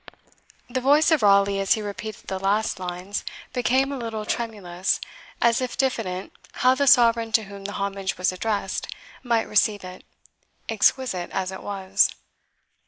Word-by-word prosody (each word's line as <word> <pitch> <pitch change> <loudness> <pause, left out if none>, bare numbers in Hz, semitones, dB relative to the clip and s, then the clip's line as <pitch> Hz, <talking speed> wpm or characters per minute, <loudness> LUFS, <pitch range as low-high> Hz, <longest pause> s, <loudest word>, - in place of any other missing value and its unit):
The 255 +1 -2
voice 295 +5 +4
of 315 - +4
Raleigh, 200 -1 +4
as 195 -1 +3
he 220 - -2
repeated 210 +1 -7
the 190 - -4
last 205 +2 0
lines, 180 +2 -4 0.3
became 260 +2 +2
a 280 - -3
little 225 -2 -4
tremulous, 195 -6 -2 0.4
as 235 +1 +3
if 255 -1 -3
diffident 220 -9 -2 0.2
how 255 0 +4
the 280 +2 0
Sovereign 230 -3 +5
to 220 - +4
whom 200 -1 -10
the 200 - -4
homage 195 -1 -3
was 185 - +1
addressed 200 +1 -2 0.3
might 235 -3 0
receive 210 -1 +2
it, 185 0 -10 0.6
exquisite 220 -3 +1
as 190 0 -2
it 190 - -8
was. 195 -1 +1
210 Hz, 155 wpm, -24 LUFS, 195-235 Hz, 0.6 s, Sovereign